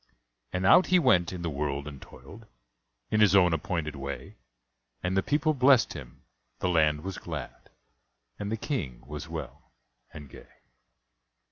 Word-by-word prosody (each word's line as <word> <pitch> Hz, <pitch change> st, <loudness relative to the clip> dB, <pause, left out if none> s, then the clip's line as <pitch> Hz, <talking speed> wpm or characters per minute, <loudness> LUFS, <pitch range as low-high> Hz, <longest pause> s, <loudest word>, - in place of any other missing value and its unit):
And 90 Hz, 0 st, -2 dB
out 180 Hz, -, +6 dB
he 185 Hz, -, +5 dB
went 115 Hz, -, +3 dB
in 90 Hz, -2 st, -6 dB
the 85 Hz, -, -1 dB
world 70 Hz, 0 st, -3 dB
and 70 Hz, -3 st, -9 dB
toiled 110 Hz, +2 st, -14 dB, 0.6 s
In 110 Hz, -, +2 dB
his 100 Hz, -2 st, +5 dB
own 90 Hz, -3 st, +5 dB
appointed 80 Hz, -5 st, -2 dB
way; 70 Hz, 0 st, -7 dB, 0.7 s
And 90 Hz, +1 st, -1 dB
the 95 Hz, -, +3 dB
people 155 Hz, +7 st, +1 dB
blessed 130 Hz, -3 st, +4 dB
him, 65 Hz, -5 st, -11 dB, 0.3 s
the 90 Hz, -, -1 dB
land 75 Hz, -3 st, +2 dB
was 95 Hz, 0 st, -5 dB
glad, 75 Hz, -6 st, -8 dB, 0.7 s
And 105 Hz, 0 st, -4 dB
the 110 Hz, -, -1 dB
King 80 Hz, -, -4 dB
was -, -, -7 dB
well -, -, -8 dB, 0.4 s
and 75 Hz, -3 st, -10 dB
gay. -, -, -15 dB
90 Hz, 155 wpm, -28 LUFS, 75-110 Hz, 0.7 s, out